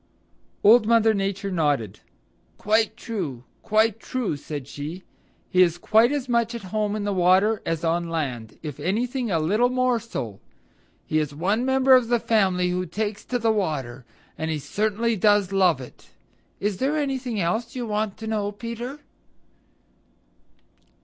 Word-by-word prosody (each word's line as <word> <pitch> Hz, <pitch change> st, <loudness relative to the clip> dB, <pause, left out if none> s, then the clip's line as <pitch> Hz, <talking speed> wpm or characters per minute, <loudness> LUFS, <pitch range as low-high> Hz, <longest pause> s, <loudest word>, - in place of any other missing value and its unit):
Old 215 Hz, +1 st, +6 dB
Mother 225 Hz, -1 st, +4 dB
Nature 195 Hz, 0 st, -2 dB
nodded. 145 Hz, -, 0 dB, 0.6 s
"Quite 220 Hz, +1 st, +1 dB
true. 170 Hz, -, -5 dB, 0.2 s
Quite 220 Hz, 0 st, +2 dB
true," 245 Hz, -8 st, -2 dB
said 145 Hz, -1 st, -7 dB
she. 155 Hz, +6 st, -7 dB, 0.5 s
"He 185 Hz, -2 st, +4 dB
is 175 Hz, -2 st, +4 dB
quite 220 Hz, +7 st, +4 dB
as 285 Hz, -3 st, -2 dB
much 235 Hz, -1 st, +1 dB
at 230 Hz, -, -6 dB
home 210 Hz, -1 st, 0 dB
in 215 Hz, -, -3 dB
the 205 Hz, 0 st, -1 dB
water 190 Hz, +4 st, +3 dB
as 165 Hz, 0 st, -1 dB
on 170 Hz, +1 st, 0 dB
land, 130 Hz, -9 st, -4 dB
if 150 Hz, -4 st, -6 dB
anything 240 Hz, +5 st, -1 dB
a 170 Hz, -, +1 dB
little 210 Hz, +10 st, +2 dB
more 255 Hz, -1 st, +1 dB
so. 120 Hz, -, -6 dB, 0.7 s
He 155 Hz, -, +1 dB
is 150 Hz, -2 st, -3 dB
one 200 Hz, +9 st, 0 dB
member 265 Hz, -1 st, +5 dB
the 240 Hz, 0 st, 0 dB
family 190 Hz, -6 st, +2 dB
who 180 Hz, 0 st, -2 dB
takes 210 Hz, +4 st, -3 dB
to 250 Hz, -, -1 dB
the 230 Hz, -1 st, +2 dB
water, 140 Hz, -, -2 dB, 0.4 s
and 160 Hz, -, -2 dB
he 160 Hz, -, -1 dB
certainly 215 Hz, +8 st, -1 dB
does 205 Hz, -1 st, +3 dB
love 185 Hz, -7 st, +3 dB
it. 125 Hz, -, -12 dB, 0.5 s
Is 200 Hz, -1 st, -1 dB
there 280 Hz, +8 st, 0 dB
anything 260 Hz, -6 st, -2 dB
else 220 Hz, +9 st, -1 dB
you 245 Hz, -2 st, -3 dB
want 210 Hz, -2 st, -2 dB
to 220 Hz, -, -8 dB
know, 210 Hz, -2 st, -1 dB
Peter?" 235 Hz, +6 st, -6 dB
205 Hz, 155 wpm, -24 LUFS, 170-230 Hz, 0.7 s, Old